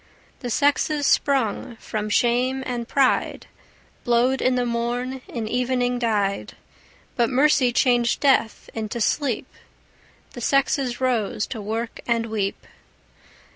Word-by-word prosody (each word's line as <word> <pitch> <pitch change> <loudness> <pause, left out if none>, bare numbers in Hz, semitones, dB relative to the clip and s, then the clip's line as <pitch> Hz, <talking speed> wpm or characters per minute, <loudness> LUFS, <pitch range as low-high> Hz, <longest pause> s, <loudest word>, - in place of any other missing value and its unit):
The 245 - -5
sexes 285 +3 +1
sprung 260 -3 +1
from 215 -1 -4
shame 250 +4 +1
and 240 -2 -3
pride, 270 -1 +1 0.6
Blowed 245 +2 +2
in 255 - +2
the 250 -1 +1
morn, 245 +2 -2
in 230 -3 -4
evening 245 +1 0
died; 205 -4 -1 0.6
But 235 -2 +2
mercy 265 -1 +3
changed 240 -1 +2
death 270 -6 +2
into 220 +1 -4
sleep; 250 +1 0 0.9
The 245 - -8
sexes 270 -1 +1
rose 230 -4 0
to 225 - -6
work 225 +3 -4
and 230 -1 +1
weep. 210 -3 -3
245 Hz, 120 wpm, -23 LUFS, 230-260 Hz, 0.9 s, mercy